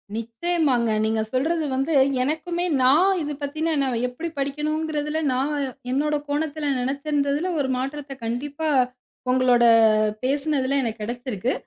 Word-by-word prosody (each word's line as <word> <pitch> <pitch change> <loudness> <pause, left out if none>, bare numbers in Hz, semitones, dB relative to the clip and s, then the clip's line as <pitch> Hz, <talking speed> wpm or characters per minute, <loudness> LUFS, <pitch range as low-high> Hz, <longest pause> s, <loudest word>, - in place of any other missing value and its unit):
நிச்சியமாங்க. 240 +2 0 0.2
நீங்க 220 0 +1
சொல்றது 315 +5 0
வந்து 270 +5 -1 0.3
எனக்குமே 340 +5 -2 0.2
நான் 300 +10 +5
இது 295 0 -3
பத்தின 315 +3 -1
நான் 255 -3 0
எப்டி 320 +7 -5
படிக்கணும்ங்கிறதுல 300 +2 -2
நான் 270 +4 0 0.4
என்னோட 300 +3 +1
கோணத்துல 295 +1 -2
நெனைச்சிருந்ததில 285 +5 -1
ஒரு 265 -2 0
மாற்றத்த 275 +2 -4
கண்டிப்பா 285 +7 -3 0.6
உங்களோட 255 -2 +4 0.6
பேசினதுல 275 0 +1
எனக்குக் 225 -1 -3
கிடைச்சிருக்கு. 240 +1 -2
280 Hz, 115 wpm, -23 LUFS, 255-310 Hz, 0.6 s, நான்